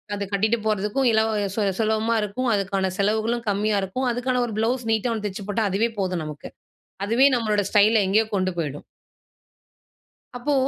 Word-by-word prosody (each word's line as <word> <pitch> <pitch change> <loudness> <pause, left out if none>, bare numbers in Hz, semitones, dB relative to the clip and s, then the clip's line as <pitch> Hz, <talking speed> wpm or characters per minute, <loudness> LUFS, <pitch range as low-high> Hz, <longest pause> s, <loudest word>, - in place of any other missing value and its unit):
அது 200 - -3
கட்டிட்டு 220 +4 +2
போறதுக்கும், 215 +5 0
இலவ 220 0 +2 0.2
சு 220 - 0 0.2
சுலபமா 220 +1 +1
இருக்கும். 235 +5 -2
அதுக்கான 195 -1 0
செலவுகளும் 220 +3 0
கம்மியா 205 +1 +1
இருக்கும். 225 +8 -2
அதுக்கான 250 +1 0
ஒரு 230 - -6
ப்ளவுஸ் 240 +2 0
நீட்டா 225 +2 +1
ஒண்ணு 215 -2 -4
தெச்சு 195 0 -7
போட்டா, 220 +2 0
அதுவே 215 +5 +1
போதும் 185 -4 -1
நமக்கு. 150 -1 -8 0.6
அதுவே 240 +6 +4
நம்மளோட 215 -3 +1
ஸ்டைல, 215 +2 +5
எங்கேயோ 210 +4 +3
கொண்டு 185 -1 0
போயிடும். 145 -3 -4 1.5
அப்போ 275 +4 -1
215 Hz, 155 wpm, -23 LUFS, 200-230 Hz, 1.5 s, ஸ்டைல